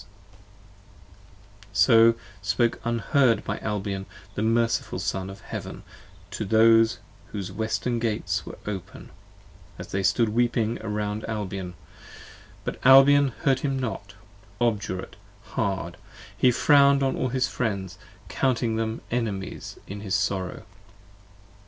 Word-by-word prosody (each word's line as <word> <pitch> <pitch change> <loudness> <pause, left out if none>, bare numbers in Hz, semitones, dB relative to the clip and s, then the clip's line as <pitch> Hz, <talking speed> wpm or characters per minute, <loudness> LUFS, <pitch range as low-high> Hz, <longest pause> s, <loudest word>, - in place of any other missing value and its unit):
S" - - -17 1.7
So 115 +3 +6 0.3
spoke, 110 +5 0
unheard 120 0 +2
by - - -3
Albion, 100 -2 -3 0.3
the 105 - -3
merciful 115 +1 +1
Son 95 0 -3
of 95 +1 -10
Heaven - - -7 0.5
To - - -3
those 115 +2 +5 0.3
whose 100 -3 -6
Western 110 +3 -2
Gates 110 -2 -1
were - - -9
open, 100 -4 -7 0.7
as - - -9
they 100 - -1
stood 110 +4 +2
weeping 115 0 +1
35 110 - -6
Around 105 0 -3
Albion: 95 -4 -4 0.9
but - - -5
Albion 135 +2 +7 0.2
heard 135 -2 +3
him 135 -1 -1
not: 105 -6 -5 0.4
obdurate, 105 -6 -2 0.3
hard, 85 -5 -2 0.4
He 125 - +4
frown'd 140 +2 +5
on 135 - +1
all 130 - -1
his 130 +1 0
Friends, 100 -6 -3 0.3
counting 120 0 0
them 110 0 -2
enemies 105 -5 -3
in 100 +1 -7
his 100 -2 -2
sorrow. 95 -2 -2
110 Hz, 120 wpm, -25 LUFS, 100-120 Hz, 1.7 s, Albion